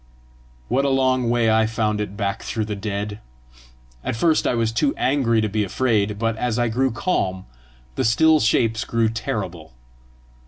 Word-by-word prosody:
What 130 Hz, +3 st, +1 dB
a 140 Hz, -, +2 dB
long 130 Hz, -2 st, +2 dB
way 120 Hz, -2 st, +2 dB
I 110 Hz, 0 st, +3 dB
found 110 Hz, -2 st, -1 dB
it 100 Hz, -1 st, -5 dB
back 100 Hz, -2 st, -2 dB
through 110 Hz, -2 st, -3 dB
the 105 Hz, -1 st, -4 dB
dead! 105 Hz, 0 st, -4 dB, 0.8 s
At -, -, -2 dB
first 160 Hz, +7 st, +2 dB
I -, -, +1 dB
was 115 Hz, -1 st, 0 dB
too 140 Hz, +5 st, 0 dB
angry 125 Hz, -4 st, +2 dB
to 110 Hz, -, 0 dB
be 105 Hz, +1 st, -1 dB
afraid, 105 Hz, -1 st, 0 dB
but 115 Hz, +1 st, -1 dB
as 120 Hz, -1 st, -1 dB
I 120 Hz, -1 st, +1 dB
grew 130 Hz, +4 st, +1 dB
calm, 95 Hz, -, -2 dB, 0.5 s
the -, -, -1 dB
still 155 Hz, +7 st, +4 dB
shapes 110 Hz, -1 st, +1 dB
grew 115 Hz, -1 st, +1 dB
terrible. 90 Hz, -, -5 dB
115 Hz, 170 wpm, -22 LUFS, 105-125 Hz, 0.8 s, still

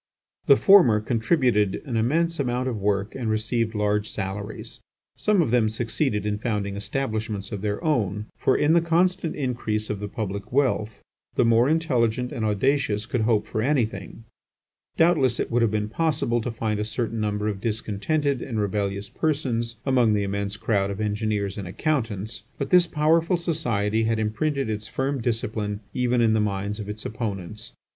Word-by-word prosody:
The 140 Hz, -, +8 dB
former 135 Hz, -, +6 dB
contributed 115 Hz, -, +1 dB
an 125 Hz, -5 st, -4 dB
immense 165 Hz, +9 st, +1 dB
amount 125 Hz, -1 st, 0 dB
of 115 Hz, -4 st, -2 dB
work 100 Hz, +1 st, 0 dB
and 120 Hz, -4 st, -3 dB
received 110 Hz, +1 st, 0 dB
large 105 Hz, 0 st, 0 dB
salaries. 100 Hz, +1 st, -6 dB, 0.4 s
Some 210 Hz, -5 st, +2 dB
of 125 Hz, -, -2 dB
them 120 Hz, -3 st, +3 dB
succeeded 110 Hz, -1 st, -1 dB
in 105 Hz, 0 st, -1 dB
founding 105 Hz, -3 st, -2 dB
establishments 110 Hz, -1 st, -3 dB
of 100 Hz, -3 st, -4 dB
their 105 Hz, 0 st, -2 dB
own; 105 Hz, -, 0 dB
for 130 Hz, -, +2 dB
in 150 Hz, +2 st, +3 dB
the 170 Hz, -, +5 dB
constant 170 Hz, +1 st, +1 dB
increase 115 Hz, -6 st, -2 dB
of 105 Hz, -, -3 dB
the 105 Hz, -, -4 dB
public 100 Hz, -1 st, -5 dB
wealth 120 Hz, -6 st, 0 dB, 0.3 s
the -, -, +3 dB
more 115 Hz, +3 st, +4 dB
intelligent 125 Hz, -7 st, +1 dB
and 120 Hz, -6 st, -3 dB
audacious 110 Hz, 0 st, +1 dB
could 120 Hz, 0 st, -1 dB
hope 110 Hz, -1 st, +2 dB
for 110 Hz, -, -2 dB
anything. 115 Hz, -6 st, -1 dB, 0.7 s
Doubtless 150 Hz, -8 st, +3 dB
it -, -, -2 dB
would 120 Hz, +1 st, +2 dB
have 115 Hz, -, +3 dB
been 105 Hz, 0 st, -1 dB
possible 120 Hz, -3 st, 0 dB
to 125 Hz, -, -3 dB
find 110 Hz, -2 st, -2 dB
a -, -, 0 dB
certain 110 Hz, +1 st, -2 dB
number 105 Hz, 0 st, -1 dB
of 100 Hz, -2 st, -3 dB
discontented 115 Hz, +6 st, -1 dB
and 115 Hz, -5 st, -3 dB
rebellious 100 Hz, -1 st, -1 dB
persons 120 Hz, -7 st, -1 dB
among 125 Hz, -5 st, +3 dB
the 100 Hz, -, +1 dB
immense 100 Hz, +1 st, -2 dB
crowd 100 Hz, -2 st, 0 dB
of 100 Hz, +1 st, -5 dB
engineers 105 Hz, -2 st, -1 dB
and 95 Hz, -, -5 dB
accountants, 110 Hz, -, -2 dB, 0.2 s
but 140 Hz, -, -4 dB
this 180 Hz, -1 st, +6 dB
powerful 165 Hz, +3 st, +2 dB
society 115 Hz, -, 0 dB
had 115 Hz, 0 st, +1 dB
imprinted 135 Hz, +6 st, -1 dB
its 110 Hz, 0 st, -4 dB
firm 135 Hz, +4 st, -2 dB
discipline 110 Hz, -3 st, -2 dB
even 125 Hz, -1 st, +2 dB
on 110 Hz, -1 st, +4 dB
the 110 Hz, -, +2 dB
minds 105 Hz, 0 st, -2 dB
of 105 Hz, -1 st, -6 dB
its 105 Hz, +1 st, -6 dB
opponents. 105 Hz, -, -5 dB
110 Hz, 170 wpm, -25 LUFS, 105-130 Hz, 0.7 s, The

